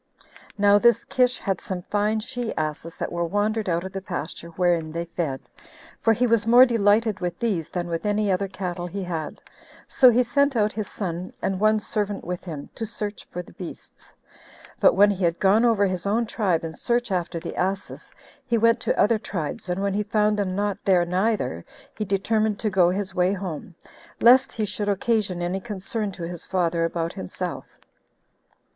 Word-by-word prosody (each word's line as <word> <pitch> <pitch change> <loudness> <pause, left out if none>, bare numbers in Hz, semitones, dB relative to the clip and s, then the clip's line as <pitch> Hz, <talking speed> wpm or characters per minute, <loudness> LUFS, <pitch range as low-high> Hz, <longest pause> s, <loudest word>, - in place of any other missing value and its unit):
Now 205 0 +5
this 235 0 +4
Kish 250 0 +2
had 195 -2 -2
some 180 -2 -4
fine 210 +2 0
she 240 0 -4
asses 155 +2 -3
that - - -4
were 170 0 -1
wandered 205 +3 0
out 170 0 0
of 190 - -6
the 195 0 -5
pasture 170 -3 -5
wherein 170 -3 +1
they 170 +1 -3
fed, 165 -5 -3 0.6
for 225 - +3
he 235 +3 +2
was 230 -2 +2
more 245 +2 +8
delighted 220 -2 +2
with 175 -1 -3
these 200 -10 -1
than 175 -1 -3
with 170 -1 -3
any 210 -1 +1
other 195 +2 0
cattle 180 -2 -4
he 195 +3 -5
had; 165 -4 -5 0.4
so 255 - +6
he 245 +1 +4
sent 280 +3 +2
out 210 -1 +2
his 215 -2 -3
son, 180 -2 -4
and 190 -1 -2
one 215 +1 +3
servant 205 -1 -3
with 180 0 -5
him, 155 -5 -6
to - - -6
search 210 -2 -5
for 180 - -6
the - - -17
beasts; 180 -4 -10 0.7
but - - +5
when 205 +2 +6
he 195 -1 -3
had 170 0 +2
gone 205 +4 +4
over 225 -4 +4
his 185 -1 -2
own 225 +4 +1
tribe 190 -7 0
in 160 -1 -5
search 240 +4 -1
after 175 -2 -1
the - - -7
asses, 190 +2 -3 0.4
he 235 -2 +2
went 230 +1 +4
to - - -1
other 215 +1 +4
tribes, 175 -4 -4
and 180 +2 -1
when 200 -1 0
he 205 - 0
found 210 0 +1
them 195 -3 -1
not 205 0 -1
there 180 -3 +3
neither, 180 - 0 0.3
he 215 - -3
determined 210 +2 +1
to 215 0 -2
go 180 -3 +4
his 190 +1 -3
way 180 +1 +2
home, 180 -3 -6 0.4
lest 255 +3 +6
he 215 - -1
should 205 0 -2
occasion 200 -3 0
any 180 +2 -1
concern 210 +1 -3
to 185 -2 -8
his 170 0 -6
father 170 -3 0
about 165 0 -2
himself. 95 - -5
195 Hz, 195 wpm, -24 LUFS, 175-215 Hz, 0.7 s, more